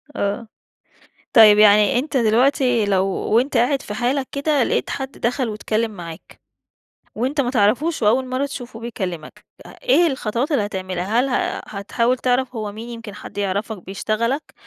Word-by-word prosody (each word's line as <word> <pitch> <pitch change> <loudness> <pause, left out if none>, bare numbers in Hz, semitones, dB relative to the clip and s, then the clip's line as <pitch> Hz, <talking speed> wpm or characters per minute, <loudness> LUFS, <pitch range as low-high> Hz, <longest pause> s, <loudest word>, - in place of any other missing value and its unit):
آه. 205 +3 -2 0.9
طيب، 215 -2 +8
يعني 210 +2 +5
أنت 280 0 -2
دلوقتي 245 0 +2
لو 195 -1 +2
وأنت 235 +7 0
قاعد 265 +4 +2
في 210 - -7
حالك 255 +4 -1
كده 285 -1 +1
لقيت - - -1
حد 270 0 -4
دخل 245 -1 -2
واتكلّم 215 +1 -2
معاك 170 -5 -11 0.7
وأنت 265 +6 0
ما 245 - -1
تعرفوش 255 +8 +1
وأول 235 +5 +3
مرّة 255 +2 -1
تشوفوه 245 -5 -8
بيكلّمك، 185 -9 -6 0.2
أ - - -11
إيه - - +4
الخطوات 260 0 -2
اللي 230 -9 +1
هتعملها؟ 190 +2 -2
هل 265 +2 +1
ه 250 - -1 0.2
هتحاول 235 +5 0
تعرف 255 0 0
هو 215 -2 -4
مين 225 +3 -9
يمكن 230 -3 -8
حد - - -11
يعرفك 200 0 -3
بيشتغلك 225 +8 -2
230 Hz, 155 wpm, -21 LUFS, 210-260 Hz, 0.9 s, طيب